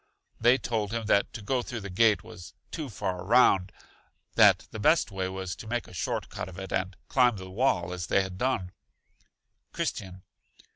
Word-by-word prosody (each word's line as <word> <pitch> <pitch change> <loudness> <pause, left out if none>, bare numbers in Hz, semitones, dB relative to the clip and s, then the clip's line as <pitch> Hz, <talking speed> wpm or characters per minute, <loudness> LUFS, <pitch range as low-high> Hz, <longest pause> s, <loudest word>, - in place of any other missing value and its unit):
They 120 +3 +5
told 110 -5 -2
him 115 -1 -2
that 100 -1 +2
to 110 - -7
go 125 +4 0
through 120 -2 -6
the 100 -1 -7
gate 110 +3 +3
was 110 -5 -12 0.2
too 155 -5 -5
far 90 -4 -3
round; 95 -4 +4 0.6
that - - +5
the 110 - -7
best 155 +2 +3
way 95 -1 -2
was 95 -1 -5
to 110 - -9
make 120 +1 -2
a - - -13
short 85 - -2
cut - - -6
of 90 - -11
it, 95 -1 -7
and 95 0 -2
climb 125 -4 +3
the 95 -1 -9
wall, 95 -6 +1
as 90 -2 -5
they 95 - +3
had 95 -1 -7
done. 95 -8 0 1.0
Christian. 95 -1 -4
100 Hz, 190 wpm, -28 LUFS, 95-115 Hz, 1.0 s, They